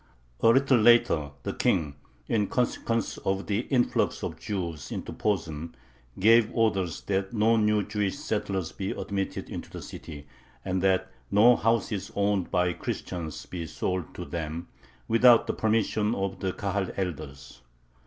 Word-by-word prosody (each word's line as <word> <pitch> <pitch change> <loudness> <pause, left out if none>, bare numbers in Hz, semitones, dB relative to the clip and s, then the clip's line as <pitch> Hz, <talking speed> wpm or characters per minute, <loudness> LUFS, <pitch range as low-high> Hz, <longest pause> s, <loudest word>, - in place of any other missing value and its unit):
A - - +3
little 130 +1 +5
later 120 -10 +4
the - - -3
King, 75 -3 +1 0.3
in 105 -3 +1
consequence 115 -2 -1
of 95 0 -1
the 105 0 0
influx 125 -3 +1
of - - -4
Jews 85 -8 -4
into - - -5
Posen, 85 -6 -2 0.4
gave 110 +3 +5
orders 100 -7 +1
that 95 0 -2
no 115 +1 +3
new 105 -1 +2
Jewish 105 +3 -2
settlers 100 - -2
be 95 0 -4
admitted 95 -1 -3
into - - -7
the - - -8
city, 75 -3 -9 0.4
and 95 -1 -1
that 95 0 +2 0.2
no 110 +5 +6
houses 115 -3 0
owned 100 -2 +1
by 90 -1 +1
Christians 85 -2 -5
be 85 -3 -6
sold 90 +2 -3
to - - -6
them, 85 0 -5 0.4
without 115 +1 +6
the - - -1
permission 110 0 +1
of 95 0 -3
the 95 - -1
Kahal 100 -2 -2
elders. 70 -8 -5
100 Hz, 145 wpm, -27 LUFS, 90-110 Hz, 0.4 s, no